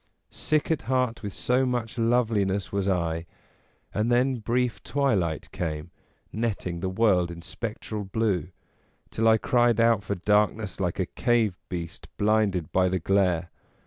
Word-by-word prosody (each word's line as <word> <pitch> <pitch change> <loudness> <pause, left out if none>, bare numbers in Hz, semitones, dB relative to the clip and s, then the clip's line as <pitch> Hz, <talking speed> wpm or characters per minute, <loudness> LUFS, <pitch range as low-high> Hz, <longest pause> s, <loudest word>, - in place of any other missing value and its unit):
Sick 155 +1 0
at 160 - +1
heart 125 -3 +1
with 100 - -4
so 125 +6 +1
much 120 -3 -2
loveli 115 -2 +2
ness 95 0 -2
was 100 -1 0
I, 85 -2 -1 0.7
and 110 +3 0
then 125 +2 +3
brief 120 +2 -1
twilight 100 - 0
came, 80 -1 -4 0.4
netting 100 -6 -2
the 95 +2 -2
world 95 -3 +2
in 85 -1 -8
spectral 105 +3 -5
blue, 100 -2 0 0.6
till 115 +1 +1
I 110 0 +6
cried 120 0 +2
out 115 -2 +4
for 100 +1 -2
darkness 105 +1 +1
like 90 -3 -1
a 95 - +2
cave 115 -2 +1
beast 85 +1 -6
blinded 105 -6 +1
by 95 0 +3
the 95 - 0
glare. 90 -2 +1
105 Hz, 150 wpm, -26 LUFS, 90-115 Hz, 0.7 s, I